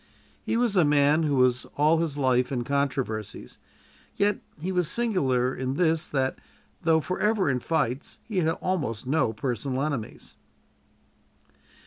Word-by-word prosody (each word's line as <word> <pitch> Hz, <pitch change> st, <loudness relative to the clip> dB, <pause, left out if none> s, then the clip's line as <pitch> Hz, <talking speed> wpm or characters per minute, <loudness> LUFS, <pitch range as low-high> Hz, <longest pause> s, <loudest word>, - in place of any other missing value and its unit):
He -, -, -1 dB
was 235 Hz, -4 st, +1 dB
a 180 Hz, -, +5 dB
man 145 Hz, +1 st, +4 dB
who 150 Hz, -3 st, +1 dB
was 125 Hz, -1 st, +2 dB
all 155 Hz, +3 st, +4 dB
his 160 Hz, -4 st, -2 dB
life 130 Hz, -2 st, +2 dB
in 125 Hz, -3 st, -1 dB
controversies, 135 Hz, -6 st, -3 dB, 0.6 s
yet 205 Hz, 0 st, +1 dB, 0.2 s
he 180 Hz, +5 st, -3 dB
was 180 Hz, -3 st, +1 dB
singular 135 Hz, -, +1 dB
in 130 Hz, +1 st, -3 dB
this, 160 Hz, -1 st, +1 dB
that, 135 Hz, -2 st, -1 dB, 0.4 s
though 160 Hz, -1 st, +3 dB
forever 190 Hz, 0 st, +1 dB
in 125 Hz, -, 0 dB
fights, 140 Hz, -2 st, -2 dB
he 210 Hz, -5 st, -2 dB
had 160 Hz, -2 st, +2 dB
almost 145 Hz, -12 st, -2 dB
no 135 Hz, -3 st, +1 dB
personal 125 Hz, +3 st, -2 dB
enemies. 140 Hz, -8 st, -5 dB
145 Hz, 140 wpm, -26 LUFS, 130-165 Hz, 0.6 s, a